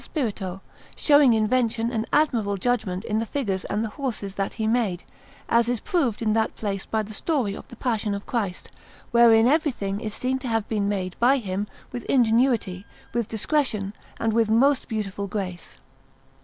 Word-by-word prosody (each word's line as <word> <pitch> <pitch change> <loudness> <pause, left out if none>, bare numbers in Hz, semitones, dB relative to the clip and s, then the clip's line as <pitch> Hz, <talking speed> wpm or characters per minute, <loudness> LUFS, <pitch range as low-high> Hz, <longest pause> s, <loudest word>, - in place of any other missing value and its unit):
Spirito, 200 - -3 0.3
showing 285 -5 +5
invention 230 +1 +1
and 225 -2 -2
admirable 235 -10 +2
judgment 195 -4 -1
in 215 +1 0
the 225 - -1
figures 200 -10 -2
and 210 +2 -1
the - - -4
horses 220 -6 -4
that 195 0 -2
he 220 - -2
made, 220 -6 0 0.4
as 235 0 +3
is 245 -2 0
proved 275 - 0
in 215 -1 +2
that 220 0 0
place 195 -3 -3
by 220 -1 0
the 215 +1 -9
story 250 -3 0
of - - -9
the - - -12
Passion 220 -5 -1
of 200 - -7
Christ, 205 -7 -3 0.4
wherein 230 -2 +6
everything 250 -9 +1
is 215 -1 -4
seen 260 +1 -1
to 260 - -6
have 225 -2 0
been 205 -2 0
made 185 -3 -2
by 255 +4 +5
him 200 -3 -3 0.2
with 245 - -5
ingenuity, 230 -6 +2 0.3
with 235 -2 -1
discretion, 220 -4 0 0.3
and 225 -1 0
with 225 -1 +2
most 265 +5 +3
beautiful 205 -3 -3
grace. 185 -3 -5
225 Hz, 175 wpm, -25 LUFS, 200-245 Hz, 0.4 s, wherein